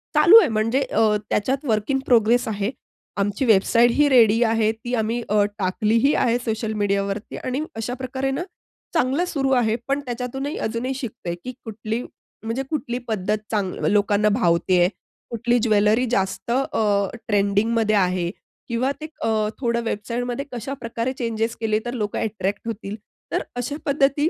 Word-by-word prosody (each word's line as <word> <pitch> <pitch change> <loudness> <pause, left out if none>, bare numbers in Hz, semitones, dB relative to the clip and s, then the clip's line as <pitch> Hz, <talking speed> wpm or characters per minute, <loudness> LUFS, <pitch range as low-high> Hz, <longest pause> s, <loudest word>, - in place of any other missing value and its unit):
चालू 340 +9 +8
आहे. 410 - +3
म्हणजे 225 +5 +1
अ, 225 -5 +2
त्याच्यात 260 +7 0
वर्क 215 -2 0
इन 270 - +2
प्रोग्रेस 235 0 +3
आहे 210 0 -1 0.5
आमची 205 +5 0
वेबसाईटही 235 +6 +4
रेडी 230 -3 +5
आहे. 225 -1 +2
ती 225 +2 -7
आम्ही 230 +1 -1
अ, 210 0 +4 0.2
टाकलीही 215 +8 +2
आहे 240 0 +2
सोशल 220 -1 -2
मीडियावरती. 200 +1 -1
आणि 255 +3 -3
अशाप्रकारे 255 +4 -3
ना, 280 +6 -2 0.5
चांगलं 325 +1 +1
सुरू 270 -3 0
आहे, 235 -4 +3
पण 275 +1 +1
त्याच्यातूनही 255 +4 -4
अजूनही 235 +4 -2
शिकतेय 215 -9 -5
की 255 - -5
कुठली, 220 +1 -4 0.4
म्हणजे 230 +4 -2
कुठली 285 -6 -2
पद्धत 210 -1 0
चांग 200 -4 0 0.2
लोकांना 205 0 +3
भावते 175 -3 +2
आहे 175 +1 +4 0.4
कुठली 240 +1 +1
ज्वेलरी 215 +2 +3
जास्त 195 +1 -1
अ, 215 -6 +1 0.2
ट्रेंडिंगमध्ये 215 +2 +2
आहे 180 -3 +1 0.4
किंवा 245 +3 0
ते - - -4 0.2
अ, - - +1 0.3
थोडं 235 -2 0
वेबसाईटमध्ये 240 +4 -3
कशाप्रकारे 245 0 -4
चेंजेस 230 -1 -1
केले 215 -1 +1
तर 240 - -3
लोकं 210 -4 -2
अट्रॅक्ट 210 0 -3
होतील. 210 -2 -5 0.4
तर - - +1
अशा 245 +4 -3
पद्धती 280 +2 +2
230 Hz, 150 wpm, -23 LUFS, 210-255 Hz, 0.5 s, चालू